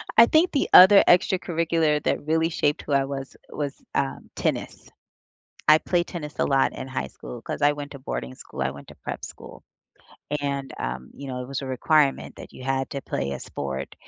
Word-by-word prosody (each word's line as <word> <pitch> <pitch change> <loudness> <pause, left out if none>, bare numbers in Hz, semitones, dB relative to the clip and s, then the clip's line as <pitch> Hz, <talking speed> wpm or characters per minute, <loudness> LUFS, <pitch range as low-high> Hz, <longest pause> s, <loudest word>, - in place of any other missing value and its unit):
I 230 - +9
think 320 +7 +3
the 280 - 0
other 195 +2 +10
extracurricular 165 -4 +2
that - - -1
really 160 +1 +2
shaped 145 -3 0
who 145 - -3
I 135 0 +4
was, 135 -1 -6
was, 145 -2 -5
um, 135 -1 -2
tennis. - - -3 0.8
I 155 +1 +8
played 175 +1 0
tennis 150 -4 -7
a - - +2
lot 135 -1 +2
in 130 - -6
high 130 - -3
school 120 - -10
'cause 145 - -6
I 145 0 +5
went 145 0 -7
to 140 - -9
boarding 65 - -5
school, 65 - -10
I 65 - 0
went 70 - -12
to - - -12
prep - - -6
school, - - -11 0.8
and, 140 -1 -3
um, 65 +1 -5
you 140 -1 -8
know, 125 -1 -4
it 125 - -9
was 140 0 -4
a - - -5
requirement 140 +2 +1
that - - -11
you 130 - -11
had 135 0 -1
to 140 -2 -5
play 70 0 -3
a - - -4
sport, 70 -1 -5
140 Hz, 205 wpm, -25 LUFS, 130-160 Hz, 0.8 s, other